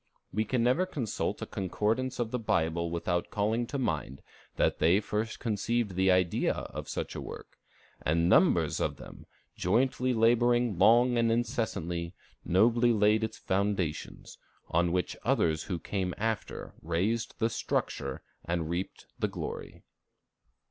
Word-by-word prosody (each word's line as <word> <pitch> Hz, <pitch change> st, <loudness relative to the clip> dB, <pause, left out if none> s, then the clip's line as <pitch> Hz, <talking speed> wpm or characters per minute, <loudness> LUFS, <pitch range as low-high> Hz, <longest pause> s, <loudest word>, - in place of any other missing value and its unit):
We 110 Hz, +3 st, +1 dB
can 120 Hz, +2 st, 0 dB
never 130 Hz, +10 st, +2 dB
consult 125 Hz, -, -3 dB
a -, -, -3 dB
concordance 110 Hz, +7 st, -1 dB
of 115 Hz, -2 st, -2 dB
the 125 Hz, -, -1 dB
Bible 85 Hz, -5 st, 0 dB
without 85 Hz, +1 st, -1 dB
calling 110 Hz, +3 st, 0 dB
to 140 Hz, -, -3 dB
mind 80 Hz, -, -2 dB, 0.3 s
that -, -, +1 dB
they 85 Hz, +5 st, +4 dB
first 110 Hz, +1 st, -3 dB
conceived 115 Hz, -1 st, -1 dB
the 95 Hz, +1 st, +2 dB
idea 90 Hz, -2 st, +2 dB
of -, -, -6 dB
such -, -, -3 dB
a -, -, -5 dB
work, -, -, -10 dB, 0.4 s
and 85 Hz, +2 st, +2 dB
numbers -, -, +4 dB
of -, -, -1 dB
them, -, -, -12 dB, 0.3 s
jointly 125 Hz, +6 st, +1 dB
laboring 120 Hz, -2 st, +3 dB
long 120 Hz, +1 st, +5 dB
and 115 Hz, -1 st, +3 dB
incessantly, 110 Hz, -, -2 dB, 0.3 s
nobly 115 Hz, +6 st, +4 dB
laid 110 Hz, 0 st, +3 dB
its 110 Hz, -, -3 dB
foundations, 95 Hz, -5 st, -2 dB, 0.3 s
on 85 Hz, +1 st, +2 dB
which 90 Hz, -1 st, -1 dB
others 80 Hz, -1 st, +1 dB
who 90 Hz, -, -2 dB
came 90 Hz, +1 st, -3 dB
after 110 Hz, -1 st, -3 dB
raised 95 Hz, +8 st, -1 dB
the 115 Hz, 0 st, +1 dB
structure 70 Hz, -10 st, -2 dB, 0.2 s
and 85 Hz, -1 st, -2 dB
reaped 90 Hz, +2 st, -4 dB
the -, -, +1 dB
glory. -, -, -7 dB
105 Hz, 140 wpm, -30 LUFS, 85-115 Hz, 0.4 s, long